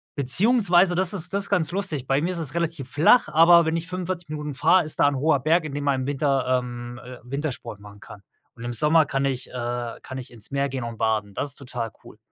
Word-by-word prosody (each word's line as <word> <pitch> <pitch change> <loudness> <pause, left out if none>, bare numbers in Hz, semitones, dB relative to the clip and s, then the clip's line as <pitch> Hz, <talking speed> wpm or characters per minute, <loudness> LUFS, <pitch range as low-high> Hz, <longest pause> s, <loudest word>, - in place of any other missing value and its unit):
beziehungsweise 180 - +3
das 185 +2 +2
ist 180 -1 -2
das 200 0 +1
ist - - -3
ganz 175 -5 +1
lustig. 170 -9 -3
Bei 135 +2 +2
mir 175 - -1
ist 180 - -4
es 155 -3 -3
relativ 165 -6 -3
flach, 160 +8 +4
aber 165 +2 +6
wenn 160 +1 0
ich 170 - -5
45 180 -2 -5
Minuten 150 -1 -5
fahr, 180 +6 +4
ist 155 - -7
da - - +5
'n 145 - 0
hoher 145 0 +2
Berg, 160 +5 +2
in 155 - -6
dem 145 0 -3
man 135 -2 +1
im 130 - -4
Winter, 135 -3 +1
ähm, 120 -1 -8
äh, 125 0 -10
Wintersport 135 -5 -5
machen 105 0 -14
kann. 100 - -12 0.3
Und 115 - -11
im 120 - -3
Sommer 150 +6 +4
kann 135 -1 -2
ich 130 -2 -3
äh, 120 -1 -4
kann 130 - -8
ich 130 - -8
ins 115 -4 -9
Meer 140 0 0
gehen 130 -2 -4
und 115 -1 -6
baden. 105 -2 -1
Das 145 - -3
ist 140 - -7
total 120 -4 -5
cool. - - -14
145 Hz, 250 wpm, -24 LUFS, 125-170 Hz, 0.3 s, aber